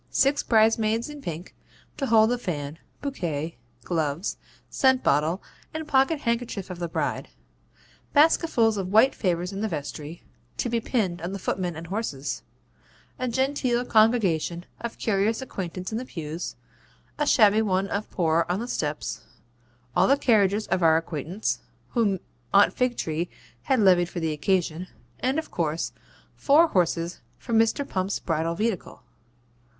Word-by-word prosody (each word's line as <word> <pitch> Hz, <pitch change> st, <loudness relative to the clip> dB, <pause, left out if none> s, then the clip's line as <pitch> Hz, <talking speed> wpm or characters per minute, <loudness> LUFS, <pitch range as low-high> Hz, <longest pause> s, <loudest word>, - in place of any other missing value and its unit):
Six 275 Hz, +2 st, +2 dB
bridesmaids 225 Hz, +2 st, +2 dB
in 295 Hz, -1 st, -9 dB
pink, 170 Hz, -, -6 dB, 0.4 s
to 275 Hz, -, -1 dB
hold 220 Hz, 0 st, +5 dB
the 245 Hz, -, 0 dB
fan, 150 Hz, -6 st, -4 dB, 0.2 s
bouquet, 165 Hz, -, -3 dB, 0.3 s
gloves, 160 Hz, 0 st, -1 dB, 0.3 s
scent 260 Hz, -1 st, +3 dB
bottle, 155 Hz, +6 st, +2 dB, 0.3 s
and 315 Hz, -1 st, -4 dB
pocket 280 Hz, +2 st, +3 dB
handkerchief 235 Hz, -5 st, -2 dB
of 175 Hz, -, -7 dB
the 170 Hz, -, -2 dB
bride; 165 Hz, -, -2 dB, 0.8 s
basketfuls 290 Hz, -7 st, +4 dB
of 190 Hz, -1 st, -3 dB
white 225 Hz, +6 st, +6 dB
favours 180 Hz, -1 st, -1 dB
in 195 Hz, -, -4 dB
the 220 Hz, -, 0 dB
vestry, 155 Hz, -1 st, -6 dB, 0.3 s
to 245 Hz, -, -1 dB
be 235 Hz, 0 st, +1 dB
pinned 190 Hz, -9 st, -1 dB
on 170 Hz, -, -3 dB
to -, -, -6 dB
the -, -, -3 dB
footmen 180 Hz, -2 st, -2 dB
and 160 Hz, +1 st, -7 dB
horses; 170 Hz, -8 st, -3 dB, 0.8 s
a 255 Hz, -, -1 dB
genteel 255 Hz, -1 st, 0 dB
congregation 195 Hz, -7 st, +2 dB
of 235 Hz, -1 st, -5 dB
curious 215 Hz, +1 st, +1 dB
acquaintance 185 Hz, -7 st, -5 dB
in 220 Hz, -, -1 dB
the 255 Hz, -, -6 dB
pews, 165 Hz, -4 st, -5 dB, 0.6 s
a 295 Hz, -, +1 dB
shabby 215 Hz, -4 st, +5 dB
one 195 Hz, -2 st, +1 dB
of 200 Hz, +2 st, -3 dB
poor 165 Hz, -2 st, +1 dB
on 180 Hz, +2 st, 0 dB
the 235 Hz, -, -4 dB
steps; 150 Hz, -9 st, -3 dB, 0.7 s
all -, -, +4 dB
the 275 Hz, -, +4 dB
carriages 210 Hz, -5 st, +3 dB
of 185 Hz, -, +1 dB
all 165 Hz, -, +6 dB
our 160 Hz, -, +5 dB
acquaintance, 165 Hz, +4 st, -2 dB, 0.3 s
whom 210 Hz, -6 st, +1 dB, 0.4 s
Aunt 200 Hz, -, +6 dB
Figtree 175 Hz, -10 st, -1 dB, 0.4 s
had 265 Hz, -3 st, +2 dB
levied 180 Hz, -4 st, +5 dB
for 180 Hz, -, -5 dB
the 160 Hz, -1 st, -1 dB
occasion; 175 Hz, +1 st, 0 dB, 0.3 s
and 260 Hz, +3 st, 0 dB
of 320 Hz, -, -3 dB
course 160 Hz, -1 st, -1 dB, 0.4 s
four 315 Hz, +4 st, +4 dB
horses 170 Hz, -, 0 dB, 0.2 s
for 235 Hz, -, -6 dB
Mr. 225 Hz, +5 st, +3 dB
Pump's 190 Hz, +1 st, -1 dB
bridal 165 Hz, 0 st, -1 dB
vehicle. 215 Hz, -1 st, -3 dB
195 Hz, 155 wpm, -26 LUFS, 170-235 Hz, 0.8 s, white